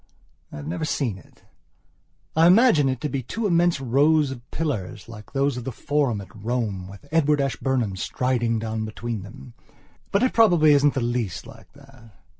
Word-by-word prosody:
I - - -9
have 75 -1 -7
never 85 - -3
seen 125 -10 -1
it. - - -22 0.9
I 165 +1 +6
imagine 180 - +5
it 130 -2 -2
to 150 - -1
be 140 -2 -3
two 220 - -4
immense 175 -4 +2
rows 140 +3 +3
of 125 -3 -7
pillars, 120 - -4
like 110 -2 -11
those 140 -1 +1
of 125 - -5
the 130 - -4
Forum 135 -4 -1
at 100 - -14
Rome, 110 -6 -2
with 100 +6 -13
Edward 150 -2 +3
Ashburnham 130 -6 -1
striding 120 +4 -1
down 110 0 -3
between 110 0 -5
them. 110 +4 -12 0.6
But 200 - +2
it 255 - +2
probably 175 -9 +5
isn'tthe 140 -2 +3
least 115 -8 -3
like - - -15
that. 135 -6 -18
130 Hz, 175 wpm, -24 LUFS, 110-150 Hz, 0.9 s, I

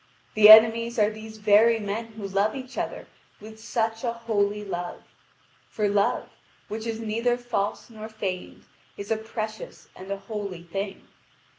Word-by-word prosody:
The 215 -1 +7
enemies 225 +2 +8
are 210 -1 +3
these 220 0 -10
very 215 +2 +4
men 220 +2 -4
who 210 -2 -6
love 200 +4 0
each 260 -1 -8
other - - -4 0.3
with 220 +1 -12
such 225 0 -2
a 235 - 0
holy 210 -3 -1
love 175 -2 -5 0.7
for 210 -1 -1
love, 200 0 +1 0.4
which 220 +1 -5
is 225 -1 -3
neither 230 +2 0
false 240 -4 -3
nor 220 -1 -9
feigned, 195 -4 -6 0.3
is 200 +2 -7
a - - +3
precious 220 0 -7
and 190 +1 -11
a 200 - -2
holy 200 -4 -6
thing. 195 +3 -6
215 Hz, 155 wpm, -25 LUFS, 200-225 Hz, 0.7 s, enemies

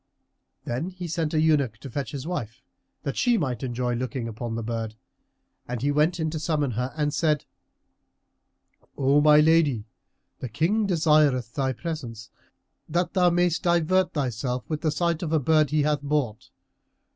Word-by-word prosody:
Then 130 +9 -2
he 180 -1 -7
sent 160 -1 -2
an 155 - +3
eunuch 145 -8 +2
to 135 - -9
fetch 140 +1 -3
his 140 -1 -6
wife 130 -9 -5 0.4
that 140 -3 -3
she 245 -2 +2
might 130 - -2
enjoy 125 -1 -2
looking 125 0 -3
upon 115 +1 -5
the 115 - -3
bird, 115 -1 -4 0.7
and 125 -1 -3
he 145 - +2
went 155 +4 +2
in 160 -1 -1
to 160 - -3
summon 150 -3 0
her 125 +3 -2
and 150 -1 0
said, 155 -1 +1 1.5
"O 140 +2 +3
my 150 0 +7
lady, 150 -8 +3 0.5
the 130 - -5
King 190 - +1
desireth 150 - +3
thy 135 -2 0
presence, 120 -7 -6 0.6
that 175 +2 0
thou 180 -1 +4
mayst 175 -1 +1
divert 175 +2 +2
thyself 125 -3 -2
with 155 -2 -3
the 160 - +1
sight 170 +1 0
of 165 -4 -3
a 160 - +3
bird 155 +1 +3
he 150 0 +2
hath 150 -1 +1
bought. 140 -7 -2
150 Hz, 170 wpm, -25 LUFS, 125-160 Hz, 1.5 s, my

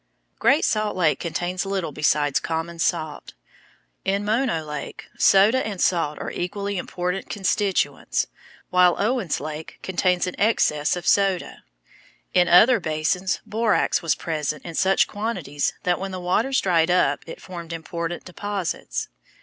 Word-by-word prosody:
Great 280 +3 +4
Salt 215 -1 0
Lake 165 -4 +2
contains 175 +2 -2
little 195 -5 -2
besides 150 -1 +2
common 165 +1 -4
salt. 155 -3 -2 0.7
In 200 +1 0
Mono 215 -6 +1
Lake, 150 -2 -6
soda 210 +7 +5
and 205 -4 -5
salt 165 -5 +1
are - - -5
equally 200 +2 -3
important 180 +2 -3
constituents, 200 -1 0 0.5
while 180 -1 +5
Owens 215 - 0
Lake 155 +1 -7
contains 180 -1 +1
an 180 - -4
excess 165 -9 +2
of 180 - -6
soda. 195 -3 +1 0.7
In 180 -1 +4
other 220 +8 +6
basins 165 +3 -1
borax 225 +1 +1
was 165 -2 +1
present 150 -2 -3
in 170 - -6
such 190 +3 +3
quantities 190 -10 -2
that 180 -1 +1
when 195 - -4
the 185 -1 -5
waters 220 +9 +1
dried 170 -3 +2
up 145 -6 +3
it - - -8
formed 170 -2 -8
important 165 +1 -5
deposits. 195 0 -4
180 Hz, 140 wpm, -23 LUFS, 165-200 Hz, 0.7 s, other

